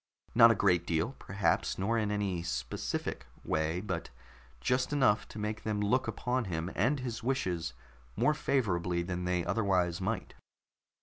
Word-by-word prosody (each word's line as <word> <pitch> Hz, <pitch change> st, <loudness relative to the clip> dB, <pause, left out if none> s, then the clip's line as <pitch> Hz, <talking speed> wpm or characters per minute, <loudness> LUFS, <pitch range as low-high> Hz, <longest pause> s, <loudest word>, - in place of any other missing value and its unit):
Not 115 Hz, 0 st, +9 dB
a 115 Hz, -, +4 dB
great 90 Hz, -4 st, +2 dB
deal, 95 Hz, +11 st, 0 dB
perhaps, 95 Hz, -4 st, 0 dB
nor 100 Hz, +5 st, 0 dB
in 110 Hz, -2 st, +1 dB
any 100 Hz, -4 st, -1 dB
specific 65 Hz, -4 st, -3 dB, 0.2 s
way, 80 Hz, +3 st, 0 dB
but 95 Hz, -5 st, -4 dB, 0.5 s
just 125 Hz, -, +1 dB
enough 130 Hz, -8 st, +3 dB
to -, -, -10 dB
make 105 Hz, +1 st, -3 dB
them 105 Hz, -1 st, -1 dB
look 115 Hz, +6 st, +2 dB
upon 125 Hz, 0 st, -1 dB
him 85 Hz, 0 st, -3 dB
and 135 Hz, +8 st, +2 dB
his 120 Hz, -2 st, -4 dB
wishes 90 Hz, -, -1 dB, 0.4 s
more 150 Hz, -, +3 dB
favorably 90 Hz, -, 0 dB
than 90 Hz, 0 st, -3 dB
they 90 Hz, -1 st, 0 dB
otherwise 90 Hz, -2 st, +1 dB
might. 110 Hz, +4 st, -2 dB
100 Hz, 150 wpm, -31 LUFS, 85-115 Hz, 0.5 s, Not